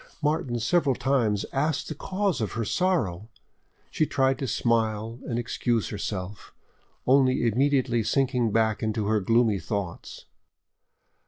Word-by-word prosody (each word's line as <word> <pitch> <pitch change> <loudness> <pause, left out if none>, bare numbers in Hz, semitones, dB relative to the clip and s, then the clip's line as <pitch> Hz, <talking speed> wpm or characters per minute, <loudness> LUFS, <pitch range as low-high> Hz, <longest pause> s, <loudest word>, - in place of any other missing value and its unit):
Martin 145 -6 0
several 135 +3 +2
times 115 -8 +1
asked 150 +2 0
the - - -4
cause 190 - -2
of 105 - -2
her 115 0 -2
sorrow; 110 - 0 0.6
she - - +1
tried 135 -3 +1
to 135 - -2
smile 115 -1 0
and 115 - -2
excuse 120 -1 -1
herself, 100 -1 -6 0.5
only 130 -2 +3
immediately 125 0 +2
sinking 125 -1 +1
back 110 -1 +1
into 110 -1 -1
her 110 +1 +2
gloomy 115 0 +2
thoughts. 100 -5 -5
120 Hz, 130 wpm, -26 LUFS, 110-135 Hz, 0.6 s, only